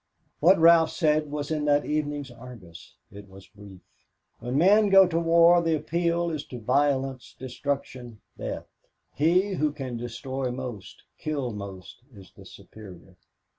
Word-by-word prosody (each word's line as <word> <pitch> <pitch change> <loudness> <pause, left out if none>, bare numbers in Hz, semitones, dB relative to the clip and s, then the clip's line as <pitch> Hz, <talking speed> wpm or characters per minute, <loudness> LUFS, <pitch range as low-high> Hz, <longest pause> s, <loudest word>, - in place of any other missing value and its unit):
What 180 +5 +5
Ralph 165 -1 +5
said 155 -2 0
was 145 +1 -5
in 150 -1 -1
that 145 0 +2
evening's 145 -3 -3
Argus. 115 -9 -13 0.2
It 100 0 -13
was 95 0 -14
brief. 100 -3 -15 0.6
"When 125 +2 -3
men 205 +6 +4
go 195 0 +7
to 165 -2 -1
war 170 +1 +5
the 165 -1 +1
appeal 170 +2 -1
is 155 -3 -4
to 125 - -9
violence, 135 +1 -1
destruction, 130 -3 -5 0.2
death. - - -6 0.5
He 180 +7 +1
who 155 -4 0
can 130 -5 -6
destroy 125 +3 -5
most, 125 -6 -8 0.2
kill 140 -5 -3
most, 100 -3 -9 0.2
is 95 -2 -15
the - - -15
superior. 95 -3 -14
140 Hz, 145 wpm, -26 LUFS, 120-160 Hz, 0.6 s, go